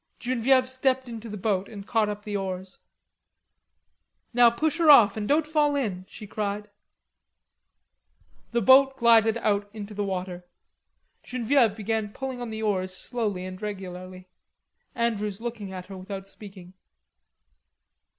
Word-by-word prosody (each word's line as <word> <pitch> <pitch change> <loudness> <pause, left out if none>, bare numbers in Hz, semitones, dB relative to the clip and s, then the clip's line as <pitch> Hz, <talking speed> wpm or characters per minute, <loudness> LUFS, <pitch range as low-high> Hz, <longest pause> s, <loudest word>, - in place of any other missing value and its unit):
Genevieve 255 +1 +2
stepped 260 0 0
into 230 -1 -8
the 210 - -6
boat 195 -1 -1
and 200 -3 -9
caught 220 -1 +1
up 205 0 -5
the 210 -1 -5
oars. 190 -1 -5 1.5
"Now 240 0 +7
push 310 +8 -1
her 325 -2 +4
off, 215 -8 +8
and 210 -1 -3
don't 300 +2 +3
fall 300 -1 +2
in," 195 -9 -3
she 215 - -10
cried. 205 0 -4 1.8
The 235 0 0
boat 265 +4 +6
glided 230 -2 +5
out 205 -2 0
into 210 0 -7
the 205 0 -2
water. 185 -2 -4 0.8
Genevieve 245 -2 +1
began 220 0 -2
pulling 265 -2 -5
on 240 - -4
the 220 0 -5
oars 185 -3 -1
slowly 205 -5 -2
and 185 +1 -8
regularly. 185 -2 -7 0.7
Andrews 210 -4 -1
looked 235 -1 -5
at 190 -2 -7
her 195 -1 -9
without 195 +1 -7
speaking. 195 -3 -12
210 Hz, 140 wpm, -26 LUFS, 195-240 Hz, 1.8 s, off